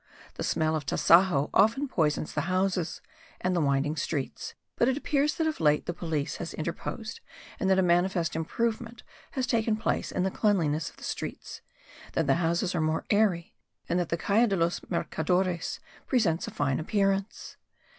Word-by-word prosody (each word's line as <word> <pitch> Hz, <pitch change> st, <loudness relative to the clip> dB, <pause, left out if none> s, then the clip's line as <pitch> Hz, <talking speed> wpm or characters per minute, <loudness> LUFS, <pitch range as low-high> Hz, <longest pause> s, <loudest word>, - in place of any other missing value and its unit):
The -, -, -5 dB
smell 160 Hz, 0 st, +1 dB
of 155 Hz, -, -2 dB
tasajo 170 Hz, -4 st, +4 dB
often 230 Hz, +8 st, +4 dB
poisons 155 Hz, -, 0 dB
the -, -, -2 dB
houses 185 Hz, -2 st, 0 dB, 0.4 s
and 180 Hz, 0 st, 0 dB
the 170 Hz, -, +2 dB
winding 140 Hz, +1 st, +1 dB
streets. 140 Hz, -2 st, -3 dB, 0.2 s
But 235 Hz, -, +2 dB
it 265 Hz, 0 st, +1 dB
appears 295 Hz, 0 st, +1 dB
that 325 Hz, -, 0 dB
of 315 Hz, -1 st, -1 dB
late 150 Hz, -1 st, +3 dB
the 175 Hz, -, -2 dB
police 160 Hz, -4 st, -3 dB
has 170 Hz, -, -6 dB
interposed 170 Hz, +7 st, -5 dB, 0.4 s
and 190 Hz, -, +1 dB
that 190 Hz, -, +4 dB
a 190 Hz, -, +4 dB
manifest 175 Hz, -1 st, +2 dB
improvement 230 Hz, +7 st, -2 dB, 0.3 s
has 260 Hz, -2 st, 0 dB
taken 225 Hz, -2 st, +1 dB
place 220 Hz, -, -1 dB
in 185 Hz, -, 0 dB
the 190 Hz, -, 0 dB
cleanliness 165 Hz, -9 st, +1 dB
of -, -, -22 dB
the -, -, -13 dB
streets; -, -, -5 dB, 0.5 s
that 165 Hz, -, +1 dB
the 135 Hz, +2 st, +3 dB
houses 170 Hz, +3 st, +1 dB
are 170 Hz, -, 0 dB
more 155 Hz, 0 st, 0 dB
airy 205 Hz, -5 st, +2 dB, 0.3 s
and 175 Hz, -, +1 dB
that 175 Hz, -, -1 dB
the 170 Hz, -, 0 dB
Calle 215 Hz, +7 st, +3 dB
de 200 Hz, -, +1 dB
los 170 Hz, -1 st, +1 dB
Mercadores 180 Hz, +1 st, -1 dB, 0.3 s
presents 195 Hz, -, +1 dB
a -, -, -5 dB
fine 135 Hz, -1 st, 0 dB
appearance. 195 Hz, +3 st, -1 dB
180 Hz, 175 wpm, -28 LUFS, 160-210 Hz, 0.5 s, tasajo